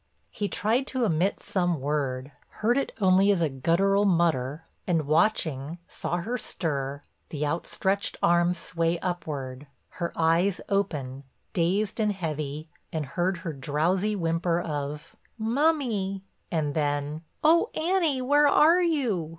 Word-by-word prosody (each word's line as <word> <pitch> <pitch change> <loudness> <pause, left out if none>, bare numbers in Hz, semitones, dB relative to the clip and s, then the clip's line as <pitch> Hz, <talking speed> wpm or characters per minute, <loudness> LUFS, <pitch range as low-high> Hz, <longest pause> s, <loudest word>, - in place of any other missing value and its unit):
He 205 -2 -3
tried 240 +6 +1
to 255 -2 0
emit 180 +1 0
some 175 -5 0
word, 135 -1 -2 0.3
heard 235 +3 +4
it 275 - 0
only 190 0 +4
as 200 -3 +3
a 165 -2 +2
guttural 175 +9 +2
mutter, 165 -6 +1 0.2
and 165 -4 +1
watching, 155 -2 +1
saw 175 - -3
her 235 +8 -3
stir, 140 -3 -3 0.3
the 150 -1 -2
out 155 +4 -2
stretched 195 +1 -1
arm 175 +1 +4
sway 170 0 -1
upward, 145 -7 -4 0.3
her 170 -1 -1
eyes 170 +4 +2
open, 140 -10 -1 0.3
dazed 195 +6 0
and 210 -1 +2
heavy, 155 -4 -4 0.2
and 155 -2 -2
heard 175 +7 -1
her 165 - -2
drowsy 165 +9 0
whimper 165 -1 0
of, 150 -2 -5 0.2
"Mummy," 225 -6 0 0.3
and 150 -3 -1
then, 145 0 -1 0.2
"Oh, 325 +2 +5
Annie, 320 -5 +1
where 290 +3 +4
are 325 +5 +5
you?" 250 - 0
175 Hz, 135 wpm, -27 LUFS, 150-205 Hz, 0.3 s, Oh